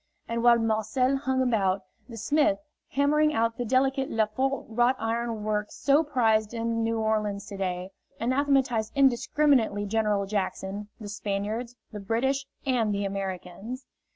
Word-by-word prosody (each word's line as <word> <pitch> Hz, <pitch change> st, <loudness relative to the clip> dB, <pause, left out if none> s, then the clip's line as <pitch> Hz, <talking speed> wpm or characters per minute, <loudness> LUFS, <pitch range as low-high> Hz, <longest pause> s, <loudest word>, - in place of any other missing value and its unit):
And 230 Hz, 0 st, -2 dB
while 240 Hz, 0 st, +6 dB
Marcel 225 Hz, +4 st, +1 dB
hung 265 Hz, -1 st, 0 dB
about, 200 Hz, -6 st, +1 dB, 0.3 s
the 230 Hz, -, -8 dB
smith, 295 Hz, +7 st, +2 dB, 0.4 s
hammering 300 Hz, +2 st, +3 dB
out 230 Hz, 0 st, +1 dB
the 245 Hz, -, -1 dB
delicate 265 Hz, +2 st, +1 dB
Lefort 225 Hz, +5 st, 0 dB
wrought 240 Hz, +3 st, +2 dB
iron 225 Hz, -1 st, -2 dB
work 210 Hz, 0 st, -1 dB
so 285 Hz, +2 st, +3 dB
prized 225 Hz, -6 st, +1 dB
in 230 Hz, 0 st, -1 dB
New 225 Hz, 0 st, 0 dB
Orleans 215 Hz, -2 st, -1 dB
to 200 Hz, -, -7 dB
day, 185 Hz, -1 st, -3 dB, 0.3 s
anathematized 260 Hz, -3 st, +1 dB
indiscriminately 265 Hz, -4 st, +3 dB
General 210 Hz, -1 st, +1 dB
Jackson, 200 Hz, 0 st, -3 dB
the 215 Hz, -, -7 dB
Spaniards, 210 Hz, +4 st, -3 dB, 0.2 s
the 210 Hz, -, -6 dB
British 265 Hz, +7 st, 0 dB, 0.2 s
and 240 Hz, -5 st, +1 dB
the 200 Hz, 0 st, -1 dB
Americans. 195 Hz, +5 st, -5 dB
225 Hz, 140 wpm, -27 LUFS, 210-260 Hz, 0.4 s, while